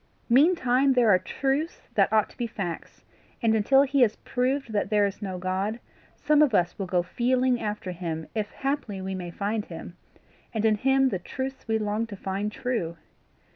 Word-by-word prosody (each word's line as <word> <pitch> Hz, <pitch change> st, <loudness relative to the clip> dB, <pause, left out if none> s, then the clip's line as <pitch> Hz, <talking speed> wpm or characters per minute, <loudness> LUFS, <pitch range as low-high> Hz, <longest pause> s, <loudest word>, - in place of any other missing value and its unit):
Meantime 270 Hz, -1 st, +4 dB
there 240 Hz, -4 st, +4 dB
are 185 Hz, -, +5 dB
truths 280 Hz, -, -2 dB
that -, -, +3 dB
ought 215 Hz, -1 st, +3 dB
to -, -, -19 dB
be 240 Hz, -, -2 dB
facts, 190 Hz, -7 st, -6 dB, 0.4 s
and 225 Hz, -2 st, +2 dB
until 270 Hz, +6 st, +4 dB
he 280 Hz, 0 st, +1 dB
has 220 Hz, -3 st, +4 dB
proved 255 Hz, -1 st, -2 dB
that 205 Hz, -, 0 dB
there 210 Hz, -2 st, +3 dB
is 200 Hz, -1 st, -4 dB
no 190 Hz, -3 st, -4 dB
God, 190 Hz, +5 st, -2 dB, 0.4 s
some 300 Hz, 0 st, +3 dB
of 275 Hz, -8 st, +4 dB
us 175 Hz, +1 st, +1 dB
will 195 Hz, -, -2 dB
go 180 Hz, -1 st, +1 dB
feeling 250 Hz, +4 st, +1 dB
after 210 Hz, -3 st, -3 dB
him 165 Hz, -3 st, -4 dB
if 215 Hz, -2 st, -2 dB
haply 270 Hz, -8 st, -3 dB
we 190 Hz, 0 st, -4 dB
may 180 Hz, -2 st, -5 dB
find 205 Hz, +4 st, -2 dB
him, 170 Hz, +1 st, -9 dB, 0.6 s
and 220 Hz, 0 st, 0 dB
in 220 Hz, -, +5 dB
him 270 Hz, +3 st, +3 dB
the 190 Hz, -, -2 dB
truths 265 Hz, +9 st, -6 dB
we 220 Hz, 0 st, +2 dB
long 215 Hz, +1 st, -1 dB
to 210 Hz, -, -8 dB
find 195 Hz, +2 st, -3 dB
true. 210 Hz, -9 st, -3 dB
220 Hz, 190 wpm, -26 LUFS, 190-260 Hz, 0.6 s, are